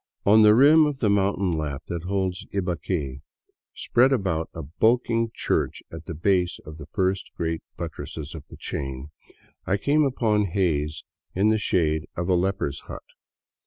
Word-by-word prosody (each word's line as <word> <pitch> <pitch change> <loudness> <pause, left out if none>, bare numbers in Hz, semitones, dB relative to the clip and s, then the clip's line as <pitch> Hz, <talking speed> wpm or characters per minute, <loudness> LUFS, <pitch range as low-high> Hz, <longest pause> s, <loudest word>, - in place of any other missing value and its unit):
On 110 +2 +6
the 105 0 +7
rim 150 +5 +7
of 145 -2 -3
the 110 -6 +1
mountain 100 -2 +1
lap 75 -4 -3
that 85 0 -5
holds 95 -1 -2
Ibaque, 85 -7 -2 0.5
spread 130 +3 +3
about 95 -10 0
a 80 - -7
bulking 115 - +1
church - - -1
at 80 0 -9
the 85 - -5
base 90 +2 +1
of 75 +1 -10
the 70 - -9
first 95 0 -1
great 80 -1 -2 0.2
buttresses 75 -1 -6
of 80 -3 -10
the - - -13
chain, 65 +1 -5 0.6
I 95 +2 +2
came 145 +8 +2
upon 110 -6 +1
Hays 80 -5 -1 0.3
in 100 +4 +3
the 110 0 +2
shade 80 -6 0
of 85 0 -2
a - - +4
leper's 90 -6 0
hut. - - -8
95 Hz, 160 wpm, -25 LUFS, 80-105 Hz, 0.6 s, the